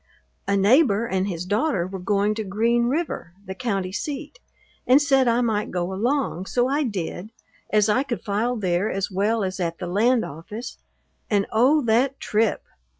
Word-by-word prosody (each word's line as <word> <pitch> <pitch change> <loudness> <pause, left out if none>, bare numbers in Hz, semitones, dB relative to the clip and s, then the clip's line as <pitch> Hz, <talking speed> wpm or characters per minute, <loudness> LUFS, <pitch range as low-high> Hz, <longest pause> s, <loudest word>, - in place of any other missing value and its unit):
A 200 0 +2
neighbor 220 +1 +4
and 190 -3 -1
his 175 -2 -4
daughter 205 - 0
were 190 +1 -6
going 200 +2 +1
to 220 0 -4
Green 230 +4 +1
River, 285 - -3
the 190 - -5
county 195 -4 -2
seat, 295 - -5 0.5
and 255 +3 +7
said 270 -3 +3
I 235 +1 +3
might 220 -1 0
go 180 +1 -2
along, 225 - -1
so 245 0 +1
I 285 +3 0
did, 200 - -4 0.4
as 210 -1 +3
I 220 +5 +3
could 260 -4 -4
file 220 +4 -1
there 190 -1 0
as 195 +1 -2
well 205 +3 +1
as 190 0 -3
at 170 -2 -2
the 180 - -5
land 225 +7 +2
office; 185 - -8 0.5
and 200 -2 +2
oh, 270 +7 +4
that 245 +4 +1
trip! 215 0 0
215 Hz, 175 wpm, -23 LUFS, 190-245 Hz, 0.5 s, and